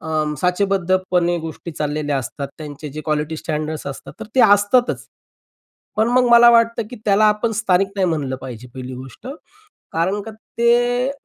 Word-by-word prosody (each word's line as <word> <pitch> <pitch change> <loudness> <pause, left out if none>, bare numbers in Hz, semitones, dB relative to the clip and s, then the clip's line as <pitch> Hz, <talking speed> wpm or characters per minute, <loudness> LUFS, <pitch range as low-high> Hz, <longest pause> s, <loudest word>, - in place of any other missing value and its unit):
अ, 160 - -8 0.3
साचेबद्धपणे 185 -1 +1
गोष्टी 160 +1 -7
चाललेल्या 150 -1 -2
असतात. 140 +3 -5
त्यांचे 150 -1 -8
जे 155 - -5
क्वालिटी 155 +1 -1
स्टँडर्ड्स 155 -1 -4
असतात, 140 0 -7
तर - - -5
ते 260 - +4
असतातच. 205 +5 +2 0.9
पण 220 +2 +2
मग 250 0 +3
मला 235 0 +8
वाटतं, 230 0 +3
की 245 - -8
त्याला 205 +1 +4
आपण 210 +2 0
स्थानिक 195 -2 +2
नाही 190 -2 +2
म्हणलं 145 -5 -2
पाहिजे, 125 -1 -9
पहिली 130 0 -7
गोष्ट. 130 - -11 0.7
कारण 185 +5 0
का 225 - -8 0.3
ते 245 +2 +3
180 Hz, 155 wpm, -20 LUFS, 150-225 Hz, 0.9 s, मला